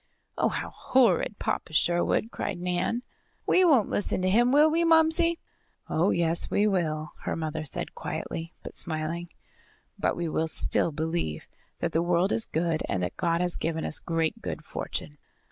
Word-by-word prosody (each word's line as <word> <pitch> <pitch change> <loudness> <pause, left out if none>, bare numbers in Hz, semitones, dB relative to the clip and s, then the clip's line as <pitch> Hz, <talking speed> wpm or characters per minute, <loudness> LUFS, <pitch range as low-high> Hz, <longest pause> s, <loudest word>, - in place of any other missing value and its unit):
"Oh, - - +2
how - - -4
horrid, 220 -5 +2
Papa 160 - -3
Sherwood!" 175 +7 +1
cried 185 -4 -4
Nan. 180 +7 -1 0.4
"We 370 - +4
won't 275 - +4
listen 205 - -1
to 185 - +2
him, 240 +4 +4
will 300 +3 +5
we, 335 +2 +2
Momsey?" 330 +1 +4 0.5
"Oh, 170 +5 +1
yes 170 0 +3
we 205 - +2
will," 155 -6 -1
her - - -3
mother 160 -1 -3
said 140 - -3
quietly, 165 +1 -5
but - - -8
smiling. 165 +1 -3 0.7
"But - - +1
we 170 -1 -2
will 160 0 0
still 160 - +2
believe 160 - -3 0.4
that - - 0
the 165 - +1
world 175 +2 +2
is 225 - +1
good 160 0 -1
and 90 -2 -1
that 90 - -3
God 170 -1 0
has 180 -1 0
given 160 -1 -2
us - - 0
great 165 +6 -1
good 155 - -5
fortune. 150 -1 -5
175 Hz, 170 wpm, -27 LUFS, 160-220 Hz, 0.7 s, will